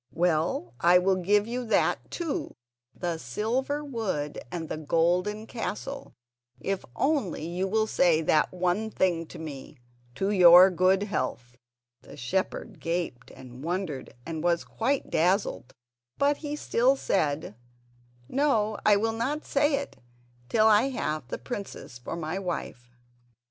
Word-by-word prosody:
Well, 160 -8 0
I 175 +1 +6
will 185 +1 +2
give 205 +3 +2
you 245 +2 -3
that 225 - +1
too, 335 -4 -4 0.4
the 170 -2 -3
silver 255 - -2
wood 205 - -3
and 165 -2 -4
the - - -4
golden 180 +7 +1
castle, 270 +4 -5 0.4
if 195 -1 -2
only 270 - 0
you 180 +3 -2
will 215 +2 +2
say 170 -6 +3
that 155 0 +3
one 185 +4 0
thing 170 -5 0
to - - -10
me: 150 -2 -8 0.4
'To 195 +8 0
your 180 -1 +8
good 185 +2 +3
health.'" 125 - -3 0.5
The 140 - -13
shepherd 185 - -3
gaped 165 -8 -3
and 130 0 -12
wondered 165 -6 -3
and 160 -2 -4
was 170 -1 +2
quite 265 +4 -2
dazzled, 175 - +1 0.5
but 285 +1 +2
he 295 -1 -4
still 260 -2 +2
said: 155 - -1 0.7
"No; 220 - +1
I 210 - +6
will 225 +2 0
not 270 +7 -2
say 290 +1 +2
it 280 0 -5 0.5
till 220 -1 +3
I 220 +4 +5
have 155 - -3
the - - -4
princess 125 - -7
for 120 - -6
my 170 +3 -3
wife." 165 -9 -5
185 Hz, 140 wpm, -27 LUFS, 160-220 Hz, 0.7 s, your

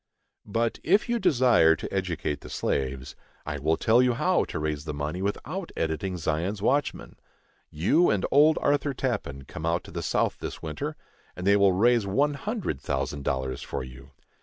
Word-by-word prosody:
But, 115 +2 -1
if 200 +8 +3
you 240 0 +1
desire 125 - +4
to - - -7
educate 85 -6 -2
the - - -10
slaves, 65 -1 -2 0.3
I 75 -1 -4
will 80 +3 +1
tell 115 +3 +4
you 125 -1 +3
how - - +2
to - - -5
raise 75 -1 -3
the 75 -2 -4
money 75 +5 -3
without 165 - -3
editing 80 +3 -2
Zion's 85 +5 -1
Watchman. 140 +8 -1 0.5
You 95 - +3
and 100 -3 +1
old 150 +3 +5
Arthur 145 -1 +1
Tappan 100 - -3
come 80 +1 -6
out 85 +2 0
to - - -12
the 85 +1 -4
South 80 - 0
this - - -6
winter, 75 -2 -4 0.4
and 90 - -6
they 100 +1 +5
will 100 -2 +4
raise 115 +2 +3
one 140 +9 +2
hundred 175 - -3
thousand 70 +1 -3
dollars 65 -2 -2
for - - -4
you. 65 +2 -12
90 Hz, 180 wpm, -27 LUFS, 75-125 Hz, 0.5 s, old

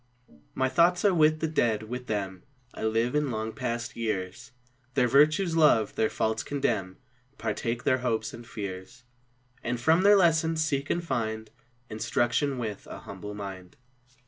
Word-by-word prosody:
My 130 - +2
thoughts 170 +8 +3
are 200 - +5
with 155 -2 +3
the 160 - +1
Dead, 115 -8 +1
with 125 +3 -6
them 95 -4 -3 0.3
I - - -5
live 115 +2 +1
in 150 -1 +1
long 110 -1 -3
past 120 -2 -4
years, 100 -3 -3 0.5
Their 125 -3 +3
virtues 155 +7 +4
love, 150 -10 +4
their 110 - +1
faults 110 0 -1
condemn, 110 -10 -2 0.4
Partake 120 -1 -2
their 130 - +2
hopes 120 -3 -1
and 120 - -9
fears, 100 +3 -7 0.6
And 120 0 -2
from 160 +8 +4
their 205 +2 +7
lessons 165 -3 +3
seek 140 -2 -1
and 170 - 0
find 110 -6 -3 0.4
Instruction 120 +5 0
with 110 -5 -5
^n - - -8
humble 105 0 -8
mind. 95 -3 -8
120 Hz, 155 wpm, -28 LUFS, 110-150 Hz, 0.6 s, their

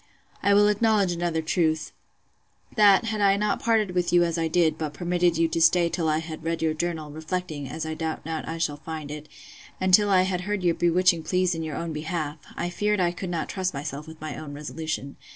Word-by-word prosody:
'I 200 0 +4
will 205 0 +6
acknowledge 210 -2 +2
another 170 -2 -1
truth: 160 -1 0 0.8
That, 205 0 +6
had 220 -2 -2
I 200 0 +4
not 210 0 0
parted 220 -4 +2
with 180 -1 0
you 175 0 +5
as 170 -1 0
I 165 -1 0
did, 160 -1 +2
but 155 -2 -5
permitted 175 -1 +1
you 165 0 +3
to 165 +1 -1
stay 170 +1 +5
till 165 -2 -1
I 155 - +2
had 160 -1 -6
read 165 0 -1
your 160 -1 +2
journal, 160 -2 -3
reflecting, 155 -2 -4
as 160 - -4
I 160 - -3
doubt 160 -1 -4
not 160 -1 -4
I 165 - -4
shall 150 -3 -1
find 155 -1 -7
it, 150 0 -8 0.5
and 185 0 0
till 205 +2 +6
I 185 -2 +5
had 185 -1 -1
heard 205 0 -3
your 175 -1 +3
bewitching 175 0 +3
pleas 180 +2 +1
in 165 - -4
your 155 -3 -4
own 165 +2 -4
behalf, 155 0 -3 0.2
I 175 - -2
feared 210 +3 0
I 175 -1 +2
could 180 +1 -6
not 170 -2 -2
trust 185 -4 -2
myself 145 +1 -5
with 160 0 -11
my 155 0 -5
own 145 -2 -8
resolution. 150 -1 -5
170 Hz, 225 wpm, -25 LUFS, 155-185 Hz, 0.8 s, will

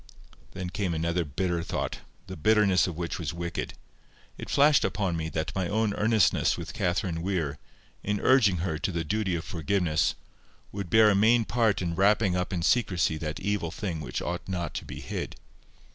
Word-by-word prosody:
Then 90 -2 -5
came 95 -5 -2
another 85 +2 0
bitter 85 +3 -2
thought, - - -3 0.3
the - - -7
bitterness 100 +1 +3
of 85 -3 -5
which 85 -1 -3
was 85 0 -4
wicked: 85 0 -4 0.6
it - - -8
flashed 145 0 +5
upon 95 -2 -1
me 80 -1 -3
that 80 -1 -3
my 95 -2 -1
own 110 +1 0
earnestness 110 0 +2
with - - -7
Catherine 85 -1 -1
Weir, 85 -6 -2 0.4
in 105 0 -1
urging 110 -9 +4
her 80 -4 -2
to - - -1
the 85 -2 -2
duty 100 +1 -1
of 80 - -3
forgiveness, 80 -1 0 0.6
would 100 -3 -5
bear 110 +2 +6
a - - +2
main 115 +3 +4
part 110 -4 +1
in 85 -1 -2
wrapping 100 +1 +3
up 90 0 -2
in 90 -3 -2
secrecy 90 -8 +2
that 75 -1 -4
evil 100 -4 -1
thing 85 -2 -4
which 75 - -4
ought 85 0 -4
not 85 -4 -3
to - - -5
be - - -8
hid. - - -5
90 Hz, 185 wpm, -27 LUFS, 85-105 Hz, 0.6 s, bear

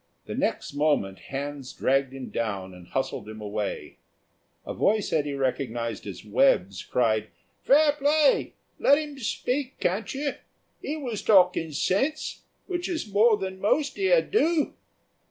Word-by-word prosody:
The - - -5
next - - -2
moment 145 -11 +1
hands 140 -1 -6
dragged 135 0 +1
him 135 -1 -8
down 100 -5 -3
and 90 -1 -13
hustled - - -3
him 110 0 -8
away. 105 -1 -4 0.7
A - - -4
voice 210 0 +1
Eddy 145 -2 0
recognised 120 -4 -2
as - - -8
Webb's 95 0 +2
cried, 110 -3 +1 0.3
"Fair 295 +2 +5
play; 290 0 +2 0.3
let 285 - +5
'im 295 -2 -5
speak, 255 +3 -2
can't 195 +4 -1
you. 285 +1 -1 0.5
'E 305 - -3
was 245 -8 -4
talking 180 -5 +4
sense, 205 - -1 0.2
which 355 -1 -3
is 315 - -4
more 215 +1 +5
than 190 -1 -5
most 275 +7 +1
here 440 +6 +3
do." 330 -7 +1
190 Hz, 140 wpm, -26 LUFS, -, 0.7 s, Fair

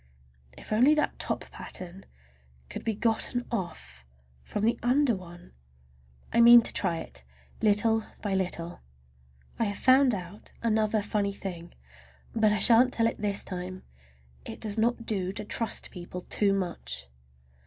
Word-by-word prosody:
If - - -7
only 255 +8 +5
that 300 - -1
top - - -2
pattern 185 +1 -9 0.6
could - - -7
be 225 -2 -1
gotten 230 +3 0
off 170 - -5 0.4
from 210 - -5
the 230 +2 +1
under 250 0 +2
one! 175 - -12 0.8
I 235 - +4
mean 235 0 +9
to - - -3
try 175 -4 0
it, 65 - -9 0.4
little 220 +1 +3 0.2
by 205 -2 -1
little. 175 -2 -2 0.8
I 230 - +2
have 205 -1 -2
found 260 -2 +4
out 185 +2 -9
another 215 -2 +1
funny 205 -1 -1
thing, 175 -4 -7 0.6
but 220 -2 +3
I 210 - +1
shan't 245 +3 +7
tell 230 - +2
it 230 - -2
this 205 -1 +1
time! 185 0 -7 0.6
It - - -9
does 215 0 -3
not 235 +1 0
do 190 -4 -1
to 210 - -5
trust 225 +1 0
people 180 0 -8
too 200 +2 0
much. 65 - -4
210 Hz, 150 wpm, -28 LUFS, 185-230 Hz, 0.8 s, mean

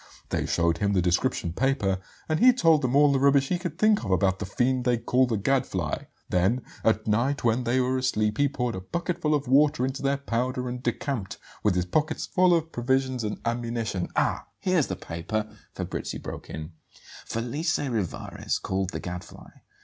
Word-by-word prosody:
They - - -1
showed 85 -1 +1
him 100 -1 +1
the 95 - +3
description 90 -1 0
paper, 105 -6 +1 0.3
and 155 0 0
he 250 +1 +7
told 165 -10 +4
them 130 0 0
all 145 0 +6
the 135 - +2
rubbish 140 0 +4
he 180 - 0
could 175 -4 -5
think 215 -5 +3
of 100 - -4
about 95 0 +2
'the 105 - -4
fiend 125 +4 +1
they 125 -1 +2
call 125 +3 +2
the 115 -3 0
Gadfly.' 100 - -1 0.2
Then 95 +8 +1 0.2
at 110 -1 +2
night, 120 +7 +1
when 120 +1 +2
they 120 +2 +2
were 130 +1 +1
asleep, 110 -4 0
he 145 0 +4
poured 125 -3 -2
a 95 - -5
bucketful 160 - -1
of 145 -2 -2
water 140 +1 +4
into 135 +1 -4
their 140 0 +1
powder 125 -1 -2
and 125 0 -4
decamped, 120 -4 -3 0.2
with 105 -4 +2
his 90 -1 +1
pockets 155 - 0
full 185 -1 +3
of 165 -1 -1
provisions 130 0 0
and 105 -1 -3
ammunition 115 -5 -2
" - - -33
"Ah, - - 0
here's 180 -6 +1
the 95 - -3
paper," 95 +5 -4 0.2
Fabrizi - - -4
broke - - -8
in: 80 +2 -6 0.6
"'Felice 140 +8 -1
Rivarez, 115 - -2
called: 95 -1 -2
The - - -4
Gadfly. 90 -1 -8
125 Hz, 190 wpm, -26 LUFS, 105-140 Hz, 0.6 s, he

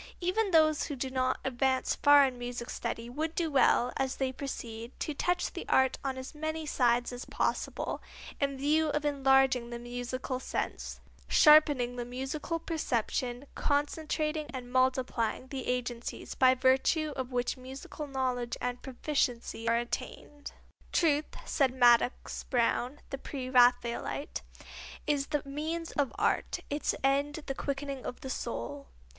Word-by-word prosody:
Even 390 +4 +1
those 310 -3 +4
who 290 - -4
do 260 0 -3
not 255 0 0
advance 260 0 +1
far 285 -1 +6
in 255 -2 -3
music 245 0 -5
study 235 0 -4
would 310 +6 -3
do 330 -3 0
well, 250 -2 +4
as 265 -1 0
they 265 -1 -1
proceed, 235 -3 -6
to 305 - -2
touch 355 +5 0
the - - -5
art 265 -1 +3
on 265 -1 -2
as 260 +3 -7
many 315 +1 -3
sides 245 -4 +2
as 245 - -6
possible, - - -2 0.4
in 275 -1 0
view 305 +3 +2
of 295 0 -1
enlarging 270 -3 +3
the 240 - -5
musical 245 +2 -4
sense, - - -4 0.3
sharpening 290 -6 +6
the 240 - -2
musical 265 +7 -3
perception, 250 -5 -2
concentrating 305 +1 -1
and 250 -2 -7
multiplying 255 -2 +1
the 265 -2 -5
agencies 245 -1 -3
by 255 0 +5
virtue 270 +4 +2
of 260 -1 -4
which 245 0 0
musical 265 +3 -8
knowledge 255 -3 -2
and 245 0 -3
proficiency 250 -4 -1
are 230 - +4
attained. 285 +4 -5 0.4
"Truth," 305 -3 +2
said 265 -3 +1
Madox 245 0 +3
Brown, 250 +2 +1
the 275 - -4
Pre 260 -3 -5
Raphaelite, 245 +2 +2 0.6
"is 285 -2 +1
the 295 -2 -1
means 315 +4 -3
of 285 -3 0
art, - - +1
its 290 +1 0
end 285 +3 +1
the 270 - -2
quickening 275 -1 -4
of 250 - -6
the 265 - -5
soul." 140 - -4
265 Hz, 145 wpm, -30 LUFS, 245-290 Hz, 0.6 s, far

